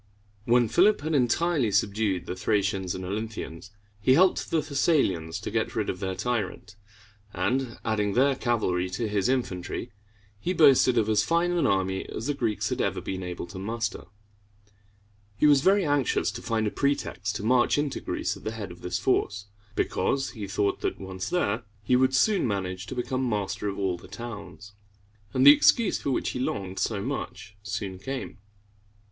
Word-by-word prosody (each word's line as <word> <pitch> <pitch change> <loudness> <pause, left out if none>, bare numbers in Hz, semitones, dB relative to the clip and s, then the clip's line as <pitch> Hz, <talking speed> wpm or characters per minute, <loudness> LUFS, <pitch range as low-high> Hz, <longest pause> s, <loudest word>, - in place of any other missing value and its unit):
When 120 0 +4
Philip 195 - +4
had 155 +2 -2
entirely 140 +1 +2
subdued 100 -2 0
the 90 - -4
Thracians 95 -2 0
and 95 - -5
Olynthians, 100 -3 -5 0.3
he 130 +6 +4
helped 185 +4 +3
the 160 - +2
Thessalians 135 - +1
to - - -5
get - - -1
rid - - 0
of 90 - -9
their 95 -1 -3
tyrant; 105 -3 -3 0.6
and, 130 -2 -1
adding 105 -2 0
their 135 +4 +3
cavalry 95 -8 0
to 105 +5 -2
his 105 +1 0
infantry, 120 -3 -2 0.5
he 180 - -1
boasted 135 -6 +5
of 110 -2 +3
as 110 -1 +3
fine 170 +1 +1
an 175 -1 +2
army 95 -1 0
as 110 - -5
the 145 - 0
Greeks 115 -6 -1
had - - -1
ever - - 0
been 95 0 -5
able 90 -1 -5
to 95 +2 -9
muster. 110 +2 -3 1.3
He - - +3
was 145 -2 +6
very 195 +3 +4
anxious 145 -8 +1
to 115 +3 -7
find 115 -2 -1
a 105 - 0
pretext 105 -7 -1
to 105 - -4
march 120 +4 +3
into 145 -2 -1
Greece - - -2
at - - -13
the 110 - -3
head 105 -5 -6
of 85 - -13
this 90 0 -2
force, 100 -2 0 0.3
because 135 +8 0
he 105 -5 -6
thought 100 0 0
that, - - -2
once 95 -1 -5
there, 115 -11 0 0.2
he 125 - +3
would 130 +1 +3
soon 200 - +3
manage 95 -2 -3
to - - -6
become 130 +1 -1
master 105 -1 -2
of 100 - -5
all 95 -3 -1
the - - -13
towns. 105 -4 -9 0.6
And 130 +3 +2
the 145 - +12
excuse 225 +7 +3
for - - -2
which 130 - 0
he - - -4
longed 95 -6 -3
so 100 -3 -1
much 100 - -5
soon 100 -3 -5
came. 130 +1 -6
110 Hz, 180 wpm, -27 LUFS, 95-130 Hz, 1.3 s, the